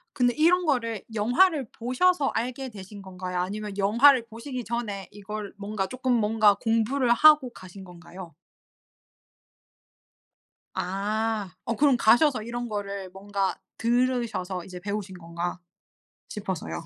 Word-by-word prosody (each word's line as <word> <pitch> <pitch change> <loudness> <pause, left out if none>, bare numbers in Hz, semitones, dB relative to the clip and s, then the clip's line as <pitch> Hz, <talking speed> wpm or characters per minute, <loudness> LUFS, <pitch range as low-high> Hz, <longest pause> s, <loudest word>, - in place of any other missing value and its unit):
근데 245 -2 +2
이런 350 +3 +4
거를 230 -7 0
영화를 250 - +3
보셔서 275 +6 +1
알게 255 +3 -3
되신 200 0 -10
건가요 185 -1 -5
아니면 205 +2 -4
영화를 235 +5 +5
보시기 240 +2 -7
전에 220 -5 -4
이걸 205 0 -7
뭔가 200 -1 -3
쪼끔 255 +2 -2
뭔가 215 -2 +4
공부를 230 +4 0
하고 300 -1 +6
가신 190 -2 -12
건가요? 175 -1 -12 2.4
아. 205 +2 -2
어 230 -2 -1
그럼 280 -3 +4
가셔서 240 +2 +4
이런 240 +1 -5
거를 200 -2 -4
뭔가 195 -1 -2 0.2
들으셔서 235 -7 0
이제 180 -1 -9
배우신 200 -1 -5
건가 170 +1 -5 0.7
싶어서요. 185 - -5
215 Hz, 270 characters per minute, -26 LUFS, 195-245 Hz, 2.4 s, 하고